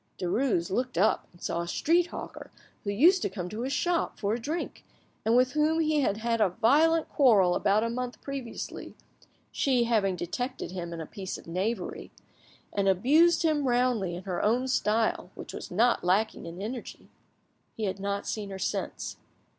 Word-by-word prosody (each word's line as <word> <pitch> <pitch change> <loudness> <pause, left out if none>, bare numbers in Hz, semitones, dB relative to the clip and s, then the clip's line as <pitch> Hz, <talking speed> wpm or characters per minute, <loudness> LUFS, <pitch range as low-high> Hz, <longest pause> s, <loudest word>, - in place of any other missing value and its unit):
Derues 180 -1 0
looked 250 +5 -1
up 205 +5 +2
and 175 - -18
saw 170 - -1
a 170 - -5
street 340 - +2
hawker - - -8 0.3
who 200 - -3
used 335 - +5
to - - 0
come 185 -2 -5
to 215 +4 -5
his 260 +2 -2
shop 345 +4 0
for 205 0 -1
a 235 - -2
drink, 310 +8 -4 0.4
and 225 +2 +3
with 255 +1 +4
whom 305 +3 +2
he 310 -2 +2
had 205 -6 +1
had 230 0 0
a 205 - +4
violent 305 - +3
quarrel 210 -10 +4
about 205 +4 +2
a 230 - 0
month 250 +1 -4
previously, 275 -4 -6 0.6
she 255 -3 +2
having 215 -5 +1
detected 245 +8 -4
him 175 -2 -5
in 165 -1 -5
a - - -5
piece 190 +2 -6
of - - -14
knavery, 185 +4 -3 0.6
and 200 -1 +1
abused 305 - +4
him 300 -4 +2
roundly 240 -7 +1
in 180 - -7
her 185 -2 -3
own 245 +5 +2
style, 220 -6 +1
which - - -8
was - - -7
not 230 +6 +2
lacking 190 +1 +1
in 170 +2 -8
energy. 235 +3 -7 0.7
He 220 - -3
had 195 -1 -2
not 200 +1 -2
seen 210 -2 -4
her 195 - -6
since. - - -3
225 Hz, 185 wpm, -28 LUFS, 190-265 Hz, 0.7 s, used